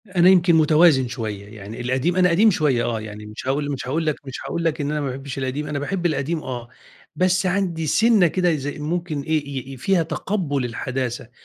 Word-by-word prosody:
أنا 185 -3 +4
يمكن 175 -2 +5
متوازن 155 -4 +5
شوية. 110 -5 -5
يعني 105 +3 -8
القديم 130 +8 0
أنا 180 -1 +4
قديم 210 +6 +5
شوية 145 -9 +1
آه، 115 -2 -1
يعني 105 0 -8
مش 105 +4 -8
هاقول 145 +2 0
مش 135 -2 -5
هاقول 160 +5 -1
لك 155 -2 +1
مش 135 -1 -7
هاقول 170 - -3
لك 160 -2 0
إن 145 +1 -2
أنا 150 0 -1
ما 140 - -2
باحبّش 135 +1 -6
القديم، 135 +3 -3
أنا 145 -1 -2
باحب 175 +5 -3
القديم 155 0 -1
آه، 120 -2 -6 0.5
بس 185 +1 +2
عندي 175 -4 0
سِنّة 220 - +4
كده 180 +2 +1
إذا 145 -1 -3
ممكن 160 0 -2
إيه، 155 0 -1
ي 135 -1 -6
ي - - -9
فيها 180 +6 +2
تَقبُّل 160 -4 -2
الحداثة. 125 0 -4
150 Hz, 210 wpm, -22 LUFS, 130-175 Hz, 0.5 s, يمكن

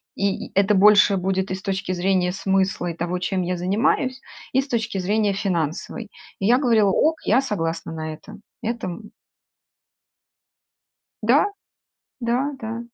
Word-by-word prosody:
И 200 -1 -2
это 200 +1 +4
больше 205 0 +6
будет 190 0 -1
и 185 - 0
с 190 - -9
точки 190 -1 -2
зрения 180 0 +1
смысла, 190 -1 0
и 170 - -3
того, 175 +2 -2
чем 185 0 -1
я 180 +1 -1
занимаюсь, 225 +8 +1 0.3
и 265 - +4
с 270 - -9
точки 230 -4 -2
зрения 205 +2 +1
финансовой. 185 +3 -2 0.3
И 195 - -2
я 245 +2 +5
говорила: 225 -6 +3
"Ок, 315 - +2
я 235 - +4
согласна 165 -10 -3
на 155 0 -4
это". 155 - -12 0.3
Это, 230 -3 -3
м 210 +4 -8 2.1
Да. - - +4 0.7
Да, 250 +4 0
да. 230 0 -4
195 Hz, 150 wpm, -23 LUFS, 180-225 Hz, 2.1 s, больше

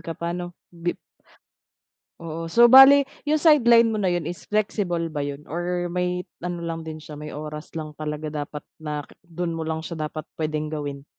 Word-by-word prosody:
ka 165 0 -6
pa 170 0 -3
ano? 175 0 -6 0.2
Bip 170 0 -3 1.2
Oo, 165 0 -5
so 235 +7 +6
bale 270 +3 +9 0.2
'yung 310 - +4
sideline 235 -8 +5
mo 215 - -1
na 190 - +2
'yun 175 -3 0
is 175 +2 -7
flexible 185 -6 -1
ba 145 - -3
'yun 145 +1 -4
or 175 +2 -2
may 180 0 -1 0.2
ano 175 -1 -4
lang 165 -1 -3
din 160 -1 -7
siya, 155 0 -11
may 150 +1 -7
oras 150 +1 -7
lang 155 -1 -5
talaga 150 0 -5
dapat 150 0 -5 0.2
na 150 -1 -4
ke - - -20
do'n 175 -1 -4
mo 165 - -4
lang 160 0 -3
siya 165 -1 -6
dapat 155 0 -7
puwedeng 155 -1 -3
gawin? 145 -2 -5
165 Hz, 195 wpm, -24 LUFS, 155-180 Hz, 1.2 s, bale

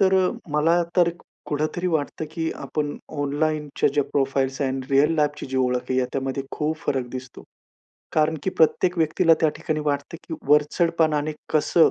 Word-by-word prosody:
तर 190 -1 +4 0.4
मला 165 +4 +3
तर 175 -2 +5 0.4
कुठेतरी 155 +4 -1
वाटतं 160 -2 -1
की 165 -1 -2
आपण 150 -1 -3 0.2
ऑनलाईनच्या 150 0 0
ज्या 145 -2 +2
प्रोफाइल्स 135 -1 0
आहेत, 135 0 -1
रिअल 145 +4 +4
लाईफची 150 -1 0
जी 130 0 -4
ओळख 125 0 0
आहे, 130 - +2
याच्यामध्ये 135 +1 -2
खूप 155 +1 -1
फरक 130 -3 0
दिसतो. 130 -1 -8 0.7
कारण 155 +1 +2
की 190 - 0
प्रत्येक 180 +1 +2
व्यक्तीला 165 +1 +4
त्या 160 - +4
ठिकाणी 155 -1 -2
वाटतं 145 +2 -2
की 160 - -3
वरचढपणाने 155 0 +2 0.2
कसं 160 +2 +4
150 Hz, 150 wpm, -24 LUFS, 135-160 Hz, 0.7 s, तर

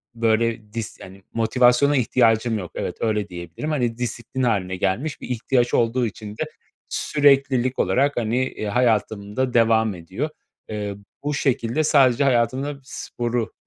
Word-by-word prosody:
böyle, 115 -1 0
dis 115 -2 -5
yani, 95 +1 -12
motivasyona 125 +5 +3
ihtiyacım 115 -2 +2
yok. 90 -3 -7
Evet, - - -4
öyle 105 -2 0
diyebilirim. 85 - -6
Hani, 120 -6 0
disiplin 125 +1 -3
hâline 95 -6 0
gelmiş. 120 +12 -2
Bir - - -8
ihtiyaç 120 0 +1
olduğu 120 +2 +2
için 105 -1 -6
de - - -1 0.5
süreklilik 135 -3 +2
olarak, 140 +1 +2
hani, 115 0 0
eee, 120 - -6
hayatımda 110 +1 0
devam 110 -3 +3
ediyor. 95 - -4 0.4
Eee, 105 -2 -4 0.3
bu 145 +1 -1
şekilde 130 0 0
sadece 140 -4 +4
hayatımda 135 +2 +1
sporu 120 -2 -3
115 Hz, 135 wpm, -23 LUFS, 110-130 Hz, 0.5 s, sadece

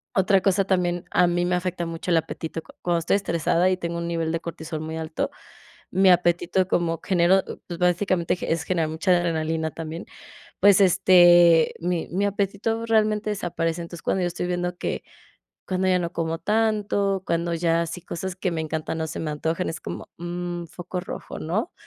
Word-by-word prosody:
Otra 190 0 +3
cosa 195 0 +2
también 180 -2 0
a 180 - +4
mí 175 0 +1
me 180 - +1
afecta 180 -1 -2
mucho 165 +2 -5
el 170 - +5
apetito, 160 0 -5
cu - - -16
cuando 175 -1 +1
estoy 170 +3 +2
estresada 170 -1 +1
y 185 - 0
tengo 170 -1 -3
un 170 0 -3
nivel 165 -1 -1
de 165 0 -1
cortisol 160 -1 -6
muy 160 +1 -5
alto, 160 0 -3 0.6
mi 190 +1 +4
apetito 175 +1 +3
como 165 -3 0
genero, 185 +1 +3 0.2
pues, 170 -1 -6
básicamente 180 -1 +1
ge 180 - -4
es 165 -1 0
generar 165 -2 0
mucha 160 +4 0
adrenalina 160 -2 -1
también. 165 +2 -6 0.6
Pues, 200 0 +6
este, 175 -3 +6
mi 175 -1 -1
mi 195 +3 +1
apetito 205 +3 -1
realmente 215 -1 +2
desaparece. 170 -4 -2
Entonces, 170 0 -9
cuando 190 - 0
yo 175 - +1
estoy 175 0 -4
viendo 180 0 -2
que - - -3 0.6
cuando 185 0 -1
ya 185 -1 +3
no 170 -1 -2
como 165 0 -2
tanto, 210 -2 +1
cuando 170 0 0
ya 165 0 +1
así 170 +2 -5
cosas 190 +2 -5
que 185 0 -1
me 165 -2 -2
encantan 160 0 -3
no 160 - -1
se 155 - -5
me 155 - -2
antojan, 160 +4 -2
es 160 - -5
como, 85 - -6
mm, 175 0 -4
foco 175 +2 -7
rojo, 180 - -7
¿no? 200 - -2
175 Hz, 190 wpm, -24 LUFS, 165-185 Hz, 0.6 s, Pues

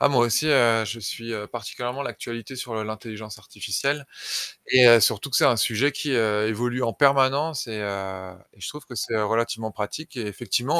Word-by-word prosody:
Ah - - +5
moi 125 -4 +4
aussi, 135 +7 +1
heu, 120 -6 +4
je 115 +2 -5
suis, 115 +3 -5
heu, 105 -1 -5
particulièrement 125 +3 -5
l'actualité 120 0 -6
sur 125 -2 -6
l'intelligence 110 0 -7
artificielle 135 +9 -3 0.6
et 125 -1 +7
heu, 115 -1 +9
surtout 115 +5 +2
que - - +1
c'est - - +5
un 120 - +5
sujet 120 +6 +2
qui, 145 +1 -3
heu, 110 -3 +2
évolue 120 +3 -1
en 115 - 0
permanence 140 +1 +3
et, 110 -2 -5
heu, 95 -2 -5 0.2
et 100 - -23
je - - -4
trouve 150 -1 -9
que 125 - -11
c'est 115 0 -1
relativement 115 +1 -1
pratique 105 +11 -6
et 115 -3 -3
effectivement 120 - 0
115 Hz, 195 wpm, -24 LUFS, 110-130 Hz, 0.6 s, heu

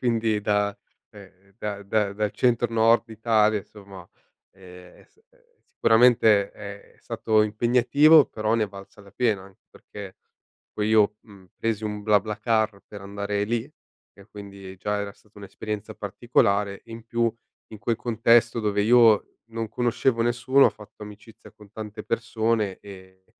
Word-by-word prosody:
Quindi 115 -3 0
da 105 0 0 0.4
cioè 100 -2 -14 0.2
da 100 -3 -5
da 100 0 0
dal 105 0 -2
centro 120 -1 +1
nord 115 +1 +3
Italia 110 -1 +1
insomma, 95 -3 -14 0.5
ehm, 90 -1 -15
sì 440 - -32
eh. - - -32 0.2
Sicuramente 110 -3 +4
è 100 -1 -11
stato 110 -1 0
impegnativo, 125 +8 +4
però 110 +1 -2
ne 115 - +1
è 105 - -8
valsa 100 +1 -13
la 100 - -18
pena. 110 -6 0
Anche 95 0 -19
perché 100 -2 -11 0.6
poi 105 0 -2
io, 105 -1 +3
mhmm, 95 -4 -18
presi 110 -1 -2
un 105 -1 -4
BlaBlaCar 110 0 0
per 100 -2 -10
andare 100 +1 -3
lì, 120 +5 -3 0.4
che 100 -1 -18
quindi 100 -2 -11
già 105 +1 -2
era 100 -1 -5
stata 105 0 -29
un'esperienza 105 +1 -7
particolare 100 -2 0
e 115 - -19
in 115 0 -9
più 115 -1 0 0.4
in 110 - -10
quel 115 +2 -1
contesto 115 0 +2
dove 105 -1 0
io 115 -2 +4
non 115 -1 -4
conoscevo 120 +1 0
nessuno 120 +3 +3
ho - - +1
fatto 105 0 -15
amicizia 105 +2 -13
con 105 -2 -18
tante 110 0 -8
persone 115 -3 -1
e 95 -2 -14
e 95 - -47
105 Hz, 155 wpm, -24 LUFS, 100-115 Hz, 0.6 s, Sicuramente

